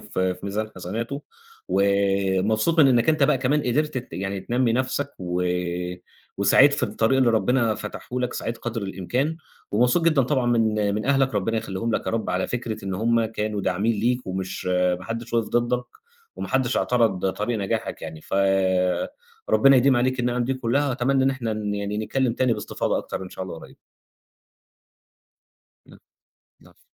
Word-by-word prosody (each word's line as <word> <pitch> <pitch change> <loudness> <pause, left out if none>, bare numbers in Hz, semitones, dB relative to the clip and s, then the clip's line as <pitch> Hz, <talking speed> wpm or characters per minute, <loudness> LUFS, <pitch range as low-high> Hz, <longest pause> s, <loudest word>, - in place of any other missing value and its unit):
في 95 0 -1
في - - -17
ميزان 110 +2 -3
حسناته، 115 +10 -4 0.5
ومبسوط 100 - +2
من 140 - +7
إنك 120 +3 +3
أنت 155 -2 +3
بقى 140 -1 +4
كمان 145 +3 +1
قدِرت 145 +2 0
ت 125 - -9
يعني 95 0 -3
تنمّي 120 +3 +1
نَفْسك 130 +3 -1
و 90 0 -2 1.0
وسعيت 130 +8 +6
في - - -4
الطريق 115 +5 +1
اللي 125 -3 +4
ربنا 115 0 +2
فتحه 105 +4 -6
لك، 125 - -1
سعيت 115 0 -4
قدْر 115 -2 -4
الإمكان 120 - -2 0.3
ومبسوط 125 +10 +3
جدًا 155 -5 +4
طبعًا 130 -1 0
من 110 -3 +2
من 105 - -3
أهلك 135 -1 +2
ربنا 115 +3 0
يخلّيهم 110 +1 -2
لك - - -2
يا - - 0
رب، 115 - -1
على - - 0
فكرة 115 -4 -4
إن 95 -1 -3
هُم 115 +3 +2
كانوا 105 -1 -3
داعمين 95 +5 +1
ليك 125 +3 0
ومش 95 0 -4
ما 90 0 +1
حدّش 115 +1 -5
وقَف 115 -2 +1
ضدّك 120 +1 0 0.5
وما - - -5
حدّش 130 -1 +1
اعترض 105 -6 +1
طريق 105 +4 -2
نجاحك 100 - -3
يعني 80 - -7
ف - - -6 1.2
ربنا 135 0 +6
يديم 130 0 +4
عليك 130 +1 +1
النِّعَم 120 0 0
دي 135 +2 -1
كلّها 130 +3 0
وأتمنّى 130 +1 +1
إن 135 - +4
إحنا 120 -4 -3
ن 105 -1 -3
يعني 100 +1 -3
نتكلّم 125 +2 0
تاني 130 0 +1
باستفاضة 105 -2 -2
أكتر - - -5
إن 90 - -7
شاء 95 - -6
الله 85 -3 -7
قريب. - - -14 2.1
امم. - - -16 0.6
العفو - - -22
115 Hz, 170 wpm, -24 LUFS, 100-130 Hz, 2.1 s, من